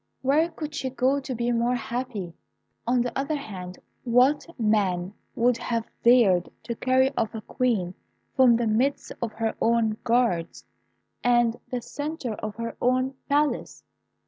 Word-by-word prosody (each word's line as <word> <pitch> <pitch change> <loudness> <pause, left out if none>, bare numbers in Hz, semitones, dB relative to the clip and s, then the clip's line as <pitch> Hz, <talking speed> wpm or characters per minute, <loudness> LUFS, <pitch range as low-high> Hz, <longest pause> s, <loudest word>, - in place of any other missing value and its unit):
Where 300 +5 +3
could 310 -2 -7
she 265 -2 -2
go 265 +2 +1
to 265 -2 -5
be 240 +1 0
more 240 +1 +1
happy? 240 -8 -4 0.5
On 245 0 +3
the 245 - -4
other 275 +3 -1
hand, 185 -10 -7 0.3
what 255 +6 +3
man 200 -4 +1 0.2
would 240 0 +3
have 235 -2 -2 0.2
dared 220 -8 +5
to 235 - -3
carry 260 +3 +2
off 225 0 -1
a 220 - -5
queen 210 -7 -1 0.4
from 255 -3 +6
the 235 0 0
midst 240 +6 0
of 230 -2 -2
her 225 0 -1
own 225 -2 +2
guards, 230 -9 0 0.6
and 240 -1 +3
the 245 -2 -3
centre 290 -5 -4
of 215 0 -6
her 230 0 -5
own 255 +2 +2 0.2
palace? 290 +1 0
240 Hz, 150 wpm, -26 LUFS, 220-260 Hz, 0.6 s, from